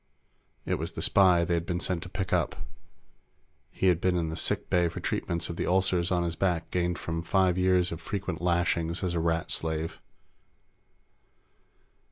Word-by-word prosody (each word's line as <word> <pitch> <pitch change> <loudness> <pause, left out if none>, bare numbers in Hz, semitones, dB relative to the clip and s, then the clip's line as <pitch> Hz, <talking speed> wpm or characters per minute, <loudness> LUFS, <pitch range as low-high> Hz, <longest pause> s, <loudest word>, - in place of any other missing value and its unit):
It - - -1
was - - -4
the - - -5
spy 90 -3 +4
they 90 - 0
had 85 0 -1
been 85 0 -1
sent 90 -2 -1
to 90 - -8
pick 95 0 -3
up. - - +1 1.1
He'd 90 -2 +1
been 90 -1 +2
in 80 -2 -1
the 80 - -4
sick - - 0
bay 90 -1 +2
for 80 - -7
treatments 85 0 -2
of 85 - -6
the - - -2
ulcers 90 -2 +2
on 90 -1 +2
his 85 -1 -2
back 90 -4 -1
gained 90 -1 0
from 85 0 -3
five 95 +1 +2
years 90 -1 +2
of 85 0 -6
frequent 90 -2 -4
lashings 85 0 0
as 90 -2 -1
a 85 - 0
Rat 80 0 0
slave. 80 0 -3
85 Hz, 180 wpm, -28 LUFS, 85-90 Hz, 1.1 s, spy